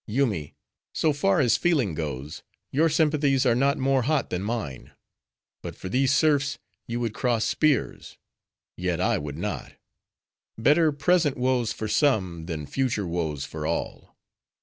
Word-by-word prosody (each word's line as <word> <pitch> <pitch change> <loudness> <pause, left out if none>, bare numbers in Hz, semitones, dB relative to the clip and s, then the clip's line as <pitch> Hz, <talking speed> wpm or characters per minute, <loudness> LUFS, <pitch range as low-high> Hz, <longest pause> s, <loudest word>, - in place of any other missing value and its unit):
Yoomy: 105 - -1 0.4
so 155 -2 +2
far 185 +5 +2
as 125 -5 +3
feeling 145 - +1
goes, 75 -2 -5 0.3
your 160 +4 +3
sympathies 145 -4 +2
are 120 - +4
not 140 +4 +2
more 135 0 +2
hot 145 +2 0
than 90 - -2
mine; 105 - -5 0.7
but - - -7
for 95 - -7
these 130 +5 +2
serfs 145 -1 +2 0.3
you 120 +1 -3
would 115 -3 -2
cross 120 -2 0
spears; 150 -6 0 0.6
yet, - - -2
I - - +1
would 75 0 -6
not. 105 +4 -4 0.8
Better 150 +7 +4
present 150 0 +2
woes 125 -2 +1
for 110 - -4
some, 95 - +1
than 80 -4 -4
future 125 - -1
woes 80 -5 -2
for 80 -1 -5
all." 85 - -4
125 Hz, 150 wpm, -25 LUFS, 90-145 Hz, 0.8 s, are